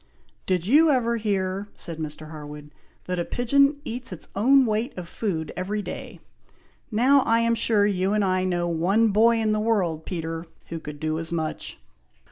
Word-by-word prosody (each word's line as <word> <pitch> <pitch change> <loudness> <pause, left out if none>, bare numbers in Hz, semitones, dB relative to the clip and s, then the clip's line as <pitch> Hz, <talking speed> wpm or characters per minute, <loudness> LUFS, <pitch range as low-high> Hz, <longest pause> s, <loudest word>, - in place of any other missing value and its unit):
"Did 180 -2 0
you 305 - +5
ever 235 -4 +2
hear," 200 -2 -1
said 165 -2 -4
Mr. 155 0 -6
Harwood, 150 -1 -9 0.3
"that 180 -1 -2
a - - +1
pigeon 280 - +2
eats 240 -2 -4
its 180 - -6
own 260 +6 +5
weight 220 +3 -1
of 180 -2 -6
food 170 -6 -3
every 205 +3 -3
day? - - -7 0.7
Now, 255 +5 +4
I 230 -3 +2
am 230 0 +2
sure, 220 -2 +3
you 195 -1 +1
and 210 -1 +2
I 185 0 +1
know 175 -2 0
one 185 +7 +2
boy 225 +3 +4
in 220 -1 +1
the 215 - +1
world, 185 -8 0
Peter, 165 -1 -4 0.2
who 165 - -4
could 150 -2 -8
do 155 +1 -1
as 165 0 -5
much." 160 -2 -3
195 Hz, 180 wpm, -25 LUFS, 165-230 Hz, 0.7 s, you